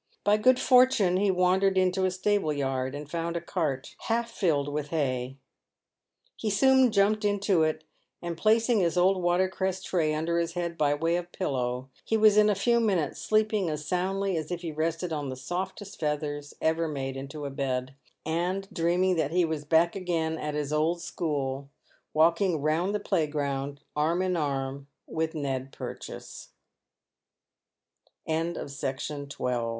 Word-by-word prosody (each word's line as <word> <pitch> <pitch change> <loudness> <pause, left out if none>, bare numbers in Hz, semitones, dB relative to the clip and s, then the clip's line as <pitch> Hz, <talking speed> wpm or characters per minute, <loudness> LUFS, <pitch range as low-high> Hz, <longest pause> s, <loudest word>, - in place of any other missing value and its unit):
By 205 +1 +4
good 255 +4 +4
fortune 250 -8 +5
he 200 +1 +2
wandered 190 +1 +3
into 185 0 +2
a - - +3
stable 185 -2 0
yard, 135 -2 -2
and 145 0 -7
found 170 +2 -2
a - - -1
cart 155 -6 -3
half 235 +1 0
filled 155 -10 +1
with 145 0 -3
hay. 135 -4 -2 1.0
He 220 - -2
soon 260 +4 +5
jumped 210 +1 +3
into 205 -3 +2
it, 155 0 0 0.4
and 170 -1 -4
placing 225 +4 +3
his 175 -1 +1
old 185 +1 +3
water 175 +2 +2
cress 190 0 -2
tray 165 -6 +1
under 170 +2 0
his 170 0 -2
head 170 -1 -3
by 145 -2 +2
way 165 +3 +1
of 175 0 -6
pillow, 130 -5 -2
he 225 - +1
was 215 -1 +6
in 210 0 +6
a 205 - +2
few 235 +4 +2
minutes 190 -10 0
sleeping 215 -4 +1
as 150 -1 -4
soundly 190 +3 0
as 155 -1 -4
if 175 0 -4
he 165 - -3
rested 165 +2 -2
on 145 -3 -3
the 130 - -4
softest 190 +7 -5
feathers 145 -1 -3
ever 160 +1 +1
made 135 -3 -4
into 140 +2 -6
a 140 - -4
bed, 130 -2 -2 0.3
and 180 +5 -1
dreaming 180 +2 +2
that 160 -3 +1
he 175 +2 +2
was 155 -2 -3
back 165 +2 +3
again 170 -4 -1
at 150 -1 -4
his 150 0 -2
old 160 +3 +1
school, 140 -5 -3 0.4
walking 170 +2 +3
round 160 +7 0
the - - 0
playground 145 -5 -1
arm 165 +5 +1
in 185 -1 0
arm 140 -3 -2 0.2
with 160 0 -2
JSTed 135 -3 -3
Purchase. - - -8 1.8
CHAPTEE 165 +2 -1
III. - - -5 0.3
CATEN 145 +1 -5
W 125 -4 -2
165 Hz, 165 wpm, -28 LUFS, 145-190 Hz, 1.8 s, was